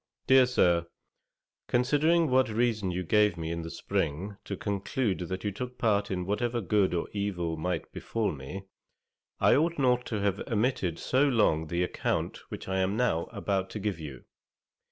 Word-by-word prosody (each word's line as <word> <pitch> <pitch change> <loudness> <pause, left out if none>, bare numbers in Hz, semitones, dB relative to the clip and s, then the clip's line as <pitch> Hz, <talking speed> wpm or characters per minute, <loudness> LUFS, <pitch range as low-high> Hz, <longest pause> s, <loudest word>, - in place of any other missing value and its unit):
'DEAR 130 -1 +6
SIR, 85 -8 +3 0.8
'Considering 150 +7 +3
what 130 -2 +4
reason 110 -3 0
you 90 +1 -2
gave 105 +1 +3
me 80 0 -3
in 85 0 -3
the 80 - -6
spring 90 +6 -2
to 100 - -5
conclude 100 +2 -1
that 95 +1 -4
you 105 - -1
took 125 +5 -6
part 105 -3 +1
in 90 -2 -2
whatever 120 +5 -1
good 100 -3 +2
or 85 - -1
evil 90 -5 -2
might 90 +3 -3
befal 115 -2 -2
me, 75 +7 -7 0.8
I - - +5
ought 165 +3 +1
not 125 -3 +2
to 110 - -2
have 100 0 0
omitted 110 -7 0
so 135 +3 +2
long 80 - +2
the 85 +3 0
account 90 - -2
which - - -7
I 95 0 0
am 95 +3 0
now 115 -10 +1
about 95 -1 -2
to 105 - -5
give 100 -4 -2
you. 70 -5 -8
100 Hz, 175 wpm, -29 LUFS, 90-120 Hz, 0.8 s, DEAR